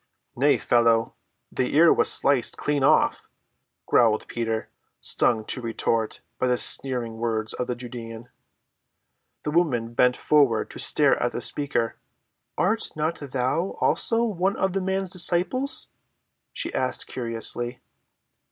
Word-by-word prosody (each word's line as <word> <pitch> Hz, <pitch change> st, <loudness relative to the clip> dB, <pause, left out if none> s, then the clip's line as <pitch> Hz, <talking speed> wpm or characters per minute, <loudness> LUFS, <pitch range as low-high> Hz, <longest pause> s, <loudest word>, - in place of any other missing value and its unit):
"Nay, 140 Hz, +4 st, +3 dB
fellow, 115 Hz, -2 st, +2 dB, 0.4 s
the 130 Hz, -, -2 dB
ear 165 Hz, +2 st, +6 dB
was -, -, +3 dB
sliced 135 Hz, -4 st, +2 dB
clean 145 Hz, -2 st, -1 dB
off," -, -, +2 dB, 0.6 s
growled 110 Hz, -3 st, +2 dB
Peter, 115 Hz, -1 st, -3 dB, 0.3 s
stung 110 Hz, -2 st, +1 dB
to 125 Hz, -, -2 dB
retort 115 Hz, -1 st, -2 dB, 0.2 s
by 130 Hz, -, +1 dB
the 125 Hz, 0 st, +1 dB
sneering 120 Hz, -5 st, +2 dB
words 110 Hz, -2 st, -2 dB
of 125 Hz, -, -4 dB
the 125 Hz, -, -2 dB
Judean. 120 Hz, -1 st, -9 dB, 1.1 s
The 150 Hz, -, -3 dB
woman 125 Hz, -9 st, 0 dB
bent 125 Hz, +1 st, +2 dB
forward 140 Hz, -7 st, +2 dB
to -, -, -10 dB
stare -, -, +3 dB
at -, -, -1 dB
the -, -, -3 dB
speaker. 140 Hz, -6 st, -2 dB, 0.6 s
"Art 220 Hz, +6 st, 0 dB
not 155 Hz, +2 st, -2 dB
thou 140 Hz, +6 st, -2 dB
also 230 Hz, 0 st, +1 dB
one 195 Hz, -3 st, -1 dB
of 190 Hz, -1 st, -1 dB
the 195 Hz, -, -1 dB
man's 190 Hz, 0 st, -2 dB
disciples?" 185 Hz, -, +1 dB, 0.6 s
she -, -, -3 dB
asked 130 Hz, 0 st, 0 dB
curiously. 120 Hz, 0 st, 0 dB
125 Hz, 135 wpm, -24 LUFS, 115-170 Hz, 1.1 s, ear